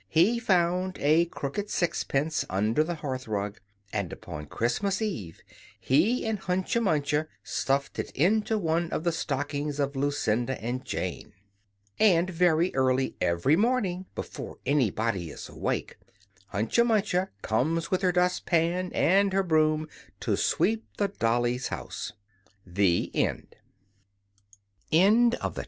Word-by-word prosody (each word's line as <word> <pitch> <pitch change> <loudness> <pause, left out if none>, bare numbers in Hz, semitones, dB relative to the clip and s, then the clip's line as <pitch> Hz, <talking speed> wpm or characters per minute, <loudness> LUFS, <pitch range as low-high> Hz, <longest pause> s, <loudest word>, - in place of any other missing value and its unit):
He 190 - +3
found 185 -3 +1
a 155 +4 +4
crooked 170 +5 -4
sixpence 155 -4 0
under 105 +9 +2
the 175 +2 -3
hearth 130 -5 -5
rug; 105 -1 -3 0.3
and 100 -5 -2
upon 75 0 -8
Christmas 190 - -1
Eve, 165 - -4 0.4
he 185 - +2
and 220 -2 -1
Hunca 190 +6 0
Munca 150 -5 +1 0.2
stuffed 140 +1 -1
it - - -3
into 215 +8 +2
one 170 -2 0
of - - -2
the 170 - +2
stockings 145 -1 -3
of 140 0 -1
Lucinda 130 -3 0
and 125 +3 -3
Jane. 130 - -4 0.7
And 185 -3 +4
very 175 0 +2
early 130 0 +1
every 85 - +3
morning 195 -4 0
before - - -7
anybody 115 - 0
is 70 - -8
awake - - -3 0.5
Hunca 110 - +2
Munca 200 -5 +1
comes 160 +10 0
with 185 - +1
her 185 -2 +3
dust 180 0 +1
pan 175 +2 +1
and 195 +3 +4
her 195 0 +2
broom 155 -2 +2 0.3
to - - +1
sweep 220 +3 +1
the 200 -1 +1
Dollies' 120 - 0
house! - - -5 0.5
THE 90 -1 +1
TALE - - 0 2.0
OF - - -1
MRS. - - -6
155 Hz, 130 wpm, -27 LUFS, 130-185 Hz, 2.0 s, a